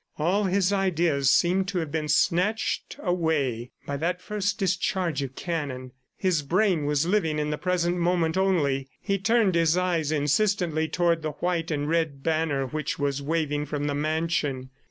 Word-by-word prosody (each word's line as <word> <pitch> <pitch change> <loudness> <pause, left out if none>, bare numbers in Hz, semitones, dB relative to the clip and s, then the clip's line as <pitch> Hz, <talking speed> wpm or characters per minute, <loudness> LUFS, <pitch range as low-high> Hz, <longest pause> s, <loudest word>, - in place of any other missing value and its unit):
All 185 +7 +1
his 190 +1 +2
ideas 170 -8 +2
seemed 185 +5 +3
to 195 -2 -2
have 160 -4 -2
been 155 -1 -2
snatched 180 +8 +1
away 155 - 0 0.2
by 140 - -3
that 175 +4 -1
first 200 +1 -2
discharge 185 -5 0
of 135 -1 -5
cannon. 140 -7 -4 0.3
His 185 -5 +1
brain 175 +1 +1
was 150 +1 +1
living 175 -5 +1
in 150 0 -1
the 150 - -2
present 180 -1 0
moment 170 -2 +1
only. 145 -9 +1
He 195 -1 -1
turned 225 -1 +3
his 165 0 +3
eyes 170 -4 0
insistently 160 +2 +1
toward 170 +1 +1
the 155 -1 -3
white 175 +1 -2
and 145 -2 -1
red 160 -4 -1
banner 155 -4 0
which 150 +2 -3
was 140 -1 -1
waving 150 -1 -1
from 145 -1 -3
the 145 - -1
mansion. 150 -3 -1
165 Hz, 165 wpm, -26 LUFS, 150-180 Hz, 0.3 s, seemed